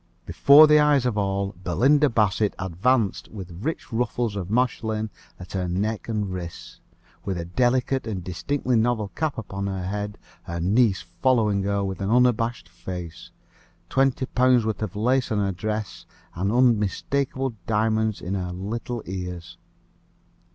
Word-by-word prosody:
Before 145 +3 +7
the 150 0 +6
eyes 145 -3 +4
of 125 -4 0
all, 100 -1 -1
Belinda 140 - +3
Bassett 105 -2 +1
advanced 95 +4 0
with 90 -5 -9
rich 160 -4 -4
ruffles 120 -2 -1
of 95 -2 -4
Mechlin 110 -2 0 0.3
at 90 0 -10
her 95 -2 -2
neck 105 +6 -2
and 105 -4 -2
wrists, 85 -2 -8 0.4
with 95 -2 -3
a 85 - -4
delicate 125 +6 +1
and 95 -5 -4
distinctly 125 - -1
novel 110 -2 +1
cap 155 +3 -3
upon 100 -3 -4
her 95 -2 -3
head, 105 +1 -4 0.2
her 85 0 -5
niece 100 +2 +2 0.2
following 110 -6 +3
her 100 +1 0
with 95 0 -4
an 95 - -1
unabashed 120 -2 +2
face, 90 -1 -8 0.6
twenty 135 -1 +2
pounds' 125 -2 +3
worth 110 -1 -2
of 105 -4 -4
lace 125 +4 +1
on 110 - +1
her 100 -1 +1
dress, 105 +2 -4 0.3
and 95 +4 -1
unmistakable 125 +3 +1
diamonds 110 0 +1
in 90 +2 -4
her 90 -2 -3
little 110 +5 -4
ears. 90 -2 -6
105 Hz, 150 wpm, -24 LUFS, 95-125 Hz, 0.6 s, Before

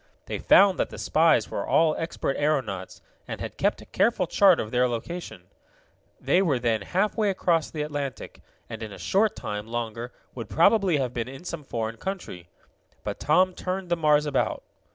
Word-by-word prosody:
They - - -4
found 195 -2 +5
that - - 0
the - - -9
spies 160 +1 +2
were - - -2
all 160 -1 +3
expert 160 -4 -3
aeronauts, 130 -11 -2 0.2
and - - -5
had - - -6
kept - - 0
a - - -16
careful 215 -4 +1
chart 190 0 +5
of 110 - -4
their 125 0 +3
location. 170 +10 -6 0.8
They 185 - +2
were 155 -9 +2
then 115 -3 0
halfway 210 - 0
across 170 -4 +1
the 150 -2 -3
Atlantic, 145 -4 -5 0.3
and 115 -1 -8
in 110 -2 -6
a - - -9
short 210 +2 +1
time 105 +1 -5
longer 115 +1 -4 0.2
would 115 -4 -7
probably 185 0 +4
have 130 -3 -2
been 120 -1 -3
in 135 +4 -10
some 170 -4 -6
foreign 115 -3 -4
country. 145 - -6 0.5
But - - -4
Tom 185 +5 +3
turned 185 0 -4
the 175 - +2
Mars 150 -2 +3
about. 145 -2 -1
150 Hz, 180 wpm, -26 LUFS, 120-180 Hz, 0.8 s, found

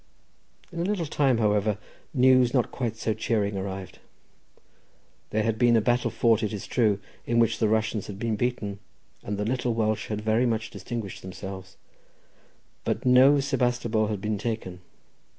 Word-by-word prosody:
In 170 - -6
a - - 0
little 190 -2 -1
time, 140 -4 +2
however, 105 -1 +1 0.3
news 130 -1 +4
not 125 - +1
quite 120 -4 -3
so 110 -1 -1
cheering 105 -2 -1
arrived. 95 -1 -5 1.3
There 110 +1 0
had 110 0 -1
been 120 -1 +5
a - - +5
battle 120 +2 +1
fought, 115 -2 +2
it 105 - -1
is 100 - -5
true, 110 -5 +2 0.3
in 115 - +1
which 115 -2 +3
the 110 - +3
Russians 110 -1 0
had 100 - -7
been 115 +1 -1
beaten, 105 -4 -2 0.4
and 100 0 -4
the 105 - -2
little 120 0 -1
Welsh 110 -1 0
had 105 -1 -3
very 110 +3 +2
much 110 -1 -2
distinguished 115 -5 -6
themselves, 95 0 -8 1.1
but - - -2
no 130 +3 +6
Sebastopol 120 -5 0
had 105 -2 -3
been 105 -1 -2
taken. 100 -5 -4
110 Hz, 165 wpm, -26 LUFS, 105-120 Hz, 1.3 s, no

